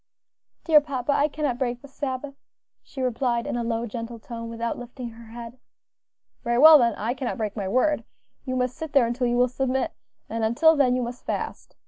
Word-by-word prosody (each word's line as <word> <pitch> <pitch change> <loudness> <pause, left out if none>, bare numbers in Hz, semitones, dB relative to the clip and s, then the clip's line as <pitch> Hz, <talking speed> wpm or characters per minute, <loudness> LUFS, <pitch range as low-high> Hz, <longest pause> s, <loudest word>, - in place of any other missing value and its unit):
"Dear 310 -3 +6
papa, 280 -2 -2
I 285 +1 +3
cannot 290 -5 -2
break 245 -1 -2
the - - -10
Sabbath," 275 0 -4 0.5
she 265 - -6
replied, 240 -1 0
in 285 - -3
a 240 - -1
low, 230 0 -1
gentle 230 +1 -6
tone, 230 0 -7
without 230 0 -3
lifting 245 0 -7
her 230 0 -13
head. 235 +2 -9 0.8
"Very 235 -1 +1
well 310 +3 +10
then, 235 -4 +2
I 225 +4 -2
cannot 255 -1 -4
break 215 -3 -3
my 200 -4 -3
word; 255 +9 +2 0.4
you 255 -1 -3
must 250 0 0
sit 320 -2 -7
there 275 -4 +5
until 240 +2 -1
you 240 0 +1
will 250 0 +4
submit; 260 +1 -1 0.3
and 230 0 -3
until 320 +9 +4
then 260 -4 +3
you 255 - 0
must 240 +1 -6
fast. - - -4
245 Hz, 200 wpm, -25 LUFS, 235-270 Hz, 0.8 s, well